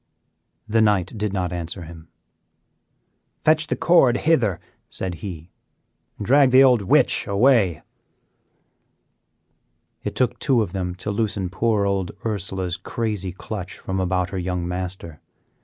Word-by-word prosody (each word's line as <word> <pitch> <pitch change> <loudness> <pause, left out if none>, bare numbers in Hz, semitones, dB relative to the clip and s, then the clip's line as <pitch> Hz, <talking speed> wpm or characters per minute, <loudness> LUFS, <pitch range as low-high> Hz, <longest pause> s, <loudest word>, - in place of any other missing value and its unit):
The 110 +1 +2
knight 105 -2 +1
did 105 -1 -2
not 90 -2 -2
answer 85 +1 -5
him. 80 0 -12 1.4
"Fetch 155 0 +3
the - - -1
cord 165 -8 +4
hither," 125 - +1 0.3
said 95 -1 -4
he, 85 -3 -8 0.7
"and 105 - -5
drag 135 +3 +5
the 130 +1 +7
old 125 -4 +5
witch 95 - +3
away." 100 - +3 2.2
It - - -4
took 125 -1 0
two 130 -6 +2
of 95 - -7
them 90 -2 -3
to 100 +3 -4
loosen 100 -3 -2
poor 105 0 +1
old 95 -3 -1
Ursela's 95 -4 -2
crazy 105 -5 -3
clutch 95 +1 -7
from 95 0 -4
about 90 -1 0
her 95 - -3
young 90 -1 -3
master. 90 -3 -6
100 Hz, 135 wpm, -22 LUFS, 90-115 Hz, 2.2 s, the